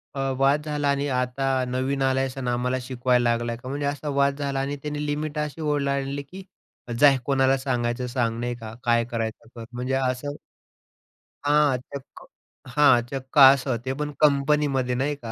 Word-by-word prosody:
अ, - - -4 0.2
वाद 140 +2 +3
झाला 150 -1 -1
आणि 140 0 0
आता 130 0 0
नवीन 130 +2 -1
आला 130 0 +2
आहेस 135 0 -2
आणि 125 -2 -2
आम्हाला 125 +1 0
शिकवायला 125 -1 +1
लागलाय 115 0 -1
का? 125 +2 -9
म्हणजे 145 +1 -3
असा 145 +1 -3
वाद 140 0 +1
झाला 140 -1 -2
आणि 140 +1 -2
त्याने 150 0 -3
लिमिट 150 +1 -3
अशी 150 +1 -4
ओलांडली 140 -2 -1
की 190 +7 -11 0.6
"जा, 145 -2 +7
कोणाला 135 -1 +3
सांगायचं 125 -2 -2
सांग." 120 -2 -1
नाही 120 0 -2
का 110 -2 -9
"काय 120 -1 +2
करायच 115 -2 -3
आहे 115 - -20
कर." 115 - -7
म्हणजे 125 +2 -3
असं 135 +2 -2 1.1
हां, 145 -2 +3
चक्क 140 +1 -11 0.5
हां, 145 -5 +6
चक्क 135 +2 -6
असं. 135 -2 +6
ते 130 - -1
पण 150 0 -2
कंपनीमध्ये 140 -3 +2
नाही 140 +3 -1
का. 115 -5 -8
135 Hz, 175 wpm, -24 LUFS, 125-145 Hz, 1.1 s, जा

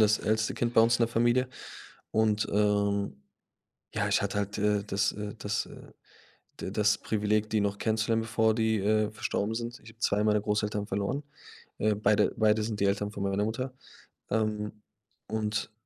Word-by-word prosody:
das 110 0 +5
älteste 110 +1 0
Kind 120 0 -1
bei 115 - +7
uns 115 +1 +5
in - - +2
der - - -3
Familie 120 +2 +3 0.6
und, 110 -1 +2
ähm, 100 -6 +1 0.7
ja, - - 0
ich - - +3
hatte - - -1
halt, 100 0 -2
äh, 105 -1 +2
das, 100 -1 0
äh 105 +1 -6
das, 105 -1 -2
äh - - -13 0.7
da - - -4
das 105 +1 +2
Privileg, 105 0 0
die 110 - +2
noch 100 0 -1
kennenzulernen, 110 0 +1
bevor 110 0 +2
die, 110 -1 +1
äh, 105 +1 +2
verstorben 110 0 -2
sind. 120 +1 -4
Ich 115 - -13
habe 115 - -20
2 105 -1 +2
meiner 105 -1 +3
Großeltern 105 0 -1
verloren, 100 +8 -1 0.6
äh, 110 0 +2
beide 105 0 +2
beide 110 0 +3
sind 105 -1 -3
die 100 - +3
Eltern 100 +1 0
von 100 - -5
meiner 100 +1 +1
Mutter. 125 +4 -3 0.6
Ähm, 105 -1 0 0.5
und 110 0 -2
105 Hz, 180 wpm, -29 LUFS, 105-110 Hz, 0.7 s, bei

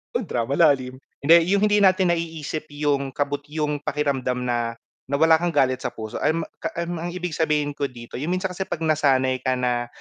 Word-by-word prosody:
oh, 240 - +1
drama 130 - -2
lalim. 140 -6 +3 0.2
Hindi, 160 +4 +6 0.2
yung 200 0 +3
hindi 205 0 +3
natin 185 -2 +4
naiisip 160 -2 -4
yung 140 -2 0
kabut 145 +1 -2
yung 150 -1 -2
pakiramdam 135 -4 -1
na, 120 -1 -1 0.3
na 140 - +1
wala 160 0 +5
kang 175 0 0
galit 130 -2 +3
sa - - -3
puso 110 -1 -6
alam 165 +1 +1
mo - - -6 0.2
a 170 - -4
um, 170 -1 -4
ang 175 +1 -4
ibig 180 -2 -3
sabihin 150 -2 0
ko 140 0 -2
dito 120 -1 -9
yung 150 - -3
minsan 185 +1 -1
kasi 190 +1 -4
'pag 165 - -4
nasanay 135 -4 +2
ka 130 0 0
na 120 -1 -1
150 Hz, 210 wpm, -23 LUFS, 130-165 Hz, 0.3 s, Hindi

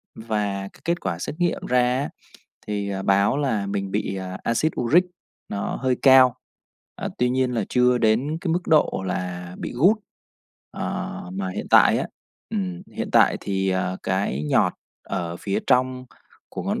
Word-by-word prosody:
và 105 -3 -2
cái - - -20
kết 170 +1 0
quả 90 -3 -3
xét 150 - -4
nghiệm 175 -1 0
ra 125 0 +3 0.2
á, 145 - -2 0.6
thì, 100 -1 -2
à, 95 -1 -3
báo 100 +5 +3
là 110 -9 0
mình 100 -1 -3
bị 95 -1 -2 0.3
Axid 150 +7 +1
uric 155 +10 +4 0.4
nó 100 - -3
hơi 130 -2 0
cao, 130 -2 +7 0.6
ờ, - - -4
tuy 125 0 +2
nhiên 130 -1 +1
là 110 -3 0
chưa 125 0 +3
đến 125 +9 +1
cái 170 -3 -1
mức 180 - 0
độ 150 -10 +3
là 90 -1 -4
bị - - -5
gút. 180 - +5 0.7
Ờ, - - -4
mà 95 0 -3
hiện - - -5
tại - - +6
á, - - -2 0.4
ừm, 90 -4 -3
hiện - - -4
tại - - +5
thì, 95 -1 -1
ờ, 95 0 -1
cái 95 -7 -1
nhọt - - +3 0.3
ở 85 -3 -4
phía 100 +2 -2
trong 130 0 +2 0.4
của - - -6
ngón - - -1
105 Hz, 170 wpm, -23 LUFS, 95-130 Hz, 0.7 s, cao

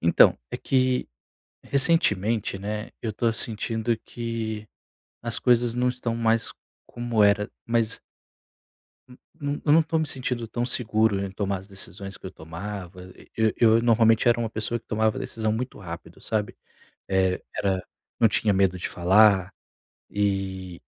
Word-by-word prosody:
Então, 85 - +5
é - - -3
que 130 -1 +1 0.6
recentemente, 115 - +2
né, 105 +2 -4
eu 115 - -1
estou 115 +2 0
sentindo 115 +1 0
que 115 -2 -4 0.6
as 115 -1 -2
coisas 120 -1 +3
não 125 +1 +1
estão 125 -2 -2
mais 115 -1 +1 0.3
como 120 -3 0
era, 105 0 +3 0.2
mas 115 -1 +1 1.1
n 125 - -15 0.2
num 145 -2 -3
eu 145 - +5
não 165 - +7
estou 160 0 0
me 160 - 0
sentindo 125 -4 -2
tão 120 +2 -2
seguro 110 -4 +1
em 100 -1 -3
tomar 100 0 -2
as 95 +2 -13
decisões 95 0 -1
que - - -22
eu - - -6
tomava, 90 +2 -8
e - - -18 0.3
eu 115 -1 +5
normalmente 115 0 +4
era 120 - +4
uma 115 - -1
pessoa 110 +2 -3
que - - -41
tomava 110 -1 +1
a - - -6
decisão 110 -1 -2
muito 120 +4 -4
rápido, 85 -3 -9
sabe, 105 -2 -2 0.5
eh, 95 -1 +1
era 95 -2 0 0.4
não 115 - +6
tinha 105 -1 +1
medo 95 -1 +2
de 85 - -3
falar, 95 +1 +4 0.6
e 95 -3 -2
110 Hz, 155 wpm, -25 LUFS, 100-120 Hz, 1.1 s, não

